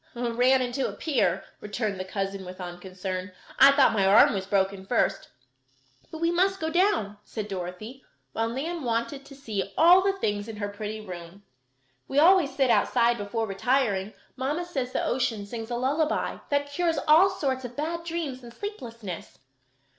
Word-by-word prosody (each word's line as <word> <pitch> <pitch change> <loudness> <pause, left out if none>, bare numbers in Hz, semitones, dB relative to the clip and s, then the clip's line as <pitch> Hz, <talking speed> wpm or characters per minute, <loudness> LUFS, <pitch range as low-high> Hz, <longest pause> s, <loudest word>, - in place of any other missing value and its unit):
"Ran 245 +2 +2
into 250 +2 -1
a - - -7
pier," 200 - 0 0.2
returned 210 -2 -3
the - - -2
cousin, 195 0 -4
with 185 0 -9
unconcern. 185 +1 -6 0.3
"I 270 - +10
thought 275 -3 +4
my 205 -3 +2
arm 195 +4 +6
was 190 -1 -3
broken 195 -1 0
first. 230 +5 0 0.8
But 320 - -8
we 335 0 +2
must 385 +2 +2
go 320 0 -2
down," 345 - +1
said 215 -1 -6
Dorothy, 195 +7 -6 0.3
while 225 0 -1
Nan 315 +8 -3
wanted 235 +4 -2
to 275 - -12
see 215 -8 -4
all 350 +3 +7
the 390 +1 +1
things 205 - -2
in 225 - -6
her 205 -1 -3
pretty 210 +1 -5
room. 180 +1 -9 0.6
"We 270 - -3
always 320 -3 +5
sit 265 -3 +3
outside 235 -1 +3
before 225 +3 -2
retiring. 210 -1 0 0.2
Mamma 290 +7 -2
says 270 -8 -3
the - - -1
ocean 235 -5 -1
sings 225 +2 -6
a 240 - -2
lullaby 285 +6 0
that 285 0 0
cures 330 +1 0
all 325 +6 +7
sorts 270 -8 -2
of 245 0 -7
bad 330 +3 -3
dreams 325 -6 -4
and 240 -1 -11
sleeplessness." 230 - -7
240 Hz, 170 wpm, -26 LUFS, 200-285 Hz, 0.8 s, I